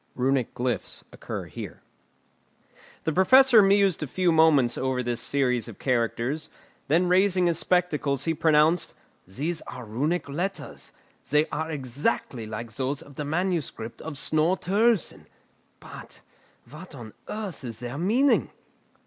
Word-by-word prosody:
[Runic 130 -1 0
glyphs 125 -4 -3
occur - - -6
here] - - -9 1.2
The 160 - -1
Professor 245 - +6
mused 195 -2 +3
a 150 - -2
few 180 +5 +1
moments 155 -7 +4
over 130 -1 -1
this 120 -1 -1
series 125 -3 0
of 115 - -10
characters; 125 +3 -1 0.4
then 170 +5 +3
raising 185 0 +3
his 170 -1 +2
spectacles 155 -7 +1
he 165 - 0
pronounced: 160 +1 +2 0.3
"These 155 - -3
are 125 -1 -8
Runic 145 +12 -1
letters; 175 +8 -5 0.4
they 150 +3 +3
are 160 +1 -3
exactly 130 -4 -2
like 110 +2 -6
those 135 +2 -3
of 145 - -15
the 150 - -4
manuscript 160 -8 -3
of 160 -2 -6
Snorre 155 +5 +1
Turlleson. 210 +2 +1 0.5
But, - - -11 0.5
what 155 +5 -11
on 115 -5 -10
earth 210 -8 -5
is 115 -3 -6
their 125 +4 -6
meaning?" 240 +11 +2
150 Hz, 135 wpm, -26 LUFS, 125-180 Hz, 1.2 s, Professor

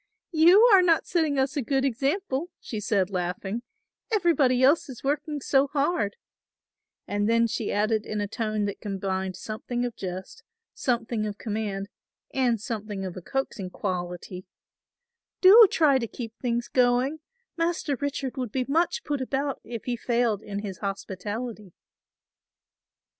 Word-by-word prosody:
"You 350 +8 +7
are 385 - +8
not 335 -3 +3
setting 315 -5 +1
us 265 +2 +1
a 285 - 0
good 270 +2 0
example," 275 - -1
she 220 - -5
said 200 -2 0
laughing; 190 +4 -3 0.5
"everybody 315 - +3
else 285 +3 +4
is 250 -3 -9
working 295 +2 -1
so 270 +1 +3
hard," 285 - 0 0.9
and 205 +1 0
then 230 0 +4
she 230 -1 -2
added 215 +1 +1
in 215 - -2
a 205 - -1
tone 215 -1 -2
that 200 - -5
combined 190 -2 -3
something 235 +5 -4
of 240 - -4
jest, 190 - -6 0.3
something 230 -3 -1
of 205 -1 -5
command 205 -3 -3 0.5
and 245 -4 +2
something 210 -3 -4
of 185 - -6
a 185 - -7
coaxing 215 -4 -3
quality, 180 +1 -5 0.9
"do 420 +4 +9
try 290 -7 +4
to 230 - -3
keep 230 0 -7
things 240 -1 -1
going; 250 +4 +2 0.4
Master 330 -4 0
Richard 280 -1 -3
would 250 -4 -3
be 255 +1 -1
much 330 +5 +1
put 290 -2 -2
about 275 +2 -2
if 230 -2 -7
he 245 - -1
failed 235 -3 0
in 205 -1 -5
his 195 -3 -6
hospitality." 205 +1 -5
240 Hz, 145 wpm, -26 LUFS, 205-280 Hz, 0.9 s, do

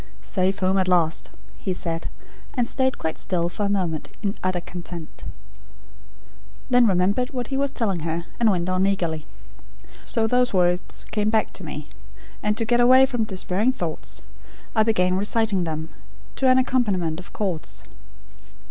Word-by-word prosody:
"Safe 190 0 +1
home 190 +1 +2
at 185 - +1
last," 170 -3 +2 0.3
he 190 - -2
said, 165 -1 -3 0.5
and 245 -3 +2
stayed 260 +1 +1
quite 160 - -3
still 175 -2 0
for 205 +3 -1
a - - -2
moment, 180 -6 -1 0.2
in 200 -1 0
utter 185 -1 +1
content. 175 -2 -8 1.5
Then 245 -1 +6
remembered 200 +6 +2
what 250 -3 -4
he 270 - -2
was 275 0 +1
telling 200 -7 -1
her, 165 +1 -3
and 230 -2 +5
went 180 -3 +1
on 185 +1 +2
eagerly. 165 -6 -1 0.8
"So 225 -3 0
those 250 -1 +2
words 180 0 +1
came 210 0 +1
back 220 0 +1
to 190 - -7
me; 150 -2 -6 0.5
and 210 0 0
to 225 - +1
get 240 +2 +3
away 255 +2 +7
from 245 -4 -1
despairing 200 +4 0
thoughts, 170 -9 -5 0.5
I 220 - +5
began 185 -4 +3
reciting 205 -2 +1
them, 160 0 -4 0.5
to 265 - +3
an 255 - +6
accompaniment 200 -11 +1
of 180 - -11
chords." 185 -7 -3
195 Hz, 160 wpm, -24 LUFS, 175-225 Hz, 1.5 s, away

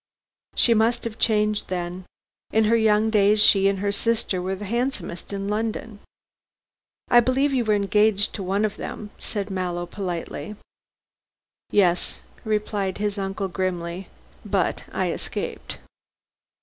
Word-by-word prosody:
"She 235 - +5
must 225 +2 +2
have 225 -1 -5
changed 210 -1 +2
then. 180 0 -4 0.4
In 220 - +3
her 220 +2 +4
young 220 -1 +3
days 210 0 +4
she 195 -2 +6
and 195 0 +1
her 200 +1 0
sister 205 -3 0
were 190 +1 -2
the 205 +2 -7
handsomest 235 -5 -3
women 195 0 -3
in - - -3
London." 220 0 -3 1.1
"I 240 - +8
believe 265 +4 +2
you 255 -2 +2
were 215 -1 +3
engaged 205 0 +2
to 205 - -5
one 195 +3 +1
of 210 0 -3
them," 210 -1 -6
said 200 -1 -4
Mallow 180 -2 -2
politely. 175 -1 -5 1.1
"Yes," 180 -4 +2 0.2
replied 210 -3 -1
his 205 0 -2
uncle 195 0 -2
grimly. 180 -1 -3 0.4
"But - - -1
I - - 0
escaped." - - -4
205 Hz, 140 wpm, -24 LUFS, 190-220 Hz, 1.1 s, I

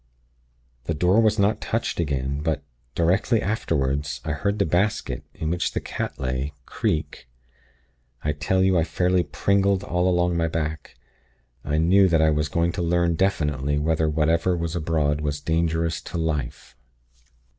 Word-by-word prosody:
"The 80 - -1
door 90 +8 +3
was 110 -1 +3
not 100 +1 +2
touched 115 -4 -2
again; 70 -2 -1
but, 80 -2 -1 0.3
directly 95 +7 +2
afterward, 70 -9 -1 0.2
I 80 - -1
heard 100 +8 -1
the 100 - +2
basket, 85 - 0
in 80 0 -3
which 85 0 -1
the - - -1
cat - - -5
lay, 65 +2 -2
creak. 75 -5 -3 0.9
I 75 - +1
tell 75 +6 0
you, 95 -2 +3
I - - +3
fairly 90 +2 +1
pringled 100 +3 +1
all 90 0 +1
along 90 -1 +1
my 85 -1 +1
back. 80 -2 -4 0.7
I 75 +1 -1
knew 95 +5 +5
that 85 -3 +3
I 80 0 +4
was 75 0 0
going 85 +2 +1
to 85 - -4
learn 85 0 +2
definitely 75 -6 0
whether 80 +1 +1
whatever 80 +4 +1
was 85 0 -3
abroad 75 -3 0
was 75 -1 -2
dangerous 80 +1 0
to - - -6
Life. 75 -6 -3
80 Hz, 155 wpm, -24 LUFS, 75-90 Hz, 0.9 s, knew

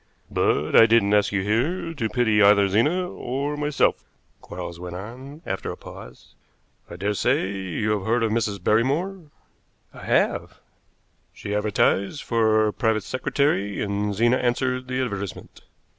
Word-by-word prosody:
"But 75 +2 +1
I 115 - +8
didn't 110 -3 +3
ask 105 -1 +3
you 100 -2 0
here 145 - -1
to 115 -8 -2
pity 110 -4 +2
either 100 0 +6
Zena 150 - +1
or 140 -2 -4
myself," 150 -1 0 0.4
Quarles 85 0 -8
went 90 0 -7
on, 130 - -9
after 95 - -3
a - - -8
pause. - - -13 0.6
"I - - -8
daresay 100 0 0
you 95 +2 -3
have 105 -2 -2
heard 115 +1 +2
of 110 - 0
Mrs. 105 -5 -1
Barrymore?" 155 - 0 0.7
"I - - -12
have." - - 0 0.8
"She 100 - -6
advertised 105 +4 0
for 110 -2 +2
a 105 - -1
private 110 -4 0
secretary, 130 -5 -1
and 100 0 -2
Zena 120 +4 +3
answered 125 +1 -1
the 130 0 -1
advertisement. 100 -5 -6
110 Hz, 145 wpm, -24 LUFS, 100-130 Hz, 0.8 s, I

